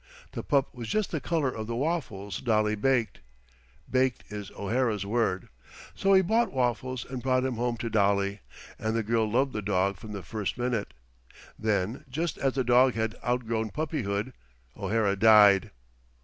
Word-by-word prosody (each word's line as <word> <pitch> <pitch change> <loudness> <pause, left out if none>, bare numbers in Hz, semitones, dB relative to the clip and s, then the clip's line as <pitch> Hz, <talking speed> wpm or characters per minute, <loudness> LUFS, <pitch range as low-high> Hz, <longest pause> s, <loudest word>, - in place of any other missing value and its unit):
The - - -4
pup 140 -3 +1
was 120 -2 -7
just 215 - 0
the 160 - -2
color 155 -6 0
of 110 -2 -6
the 115 - -3
waffles 115 - -2
Dolly 110 -3 +2
baked 115 +1 0 0.7
"baked" 130 -1 +1
is 105 -3 -6
O'Hara's 110 -1 0
word. 100 -4 0 0.5
So 195 0 +2
he 190 - +6
bought 225 +5 +2
Waffles 130 0 -1
and 130 -1 -6
brought 130 0 +1
him 130 - -1
home 120 0 -1
to 115 - -4
Dolly, 100 -2 +1 0.4
and 110 +1 -1
the 115 - 0
girl 110 0 +1
loved 130 +4 +1
the 105 - -2
dog 100 -1 0
from 105 +3 -10
the 100 -2 -6
first 105 +6 -4
minute. 120 -4 -2 0.6
Then, 105 +1 -1
just 160 +5 -3
as 135 -1 +1
the 130 - +1
dog 125 +1 +4
had 110 -1 -1
outgrown 115 -3 -1
puppyhood, 130 -7 -2 0.4
O'Hara 105 -3 0
died. 105 -1 +6
115 Hz, 165 wpm, -28 LUFS, 105-130 Hz, 0.7 s, he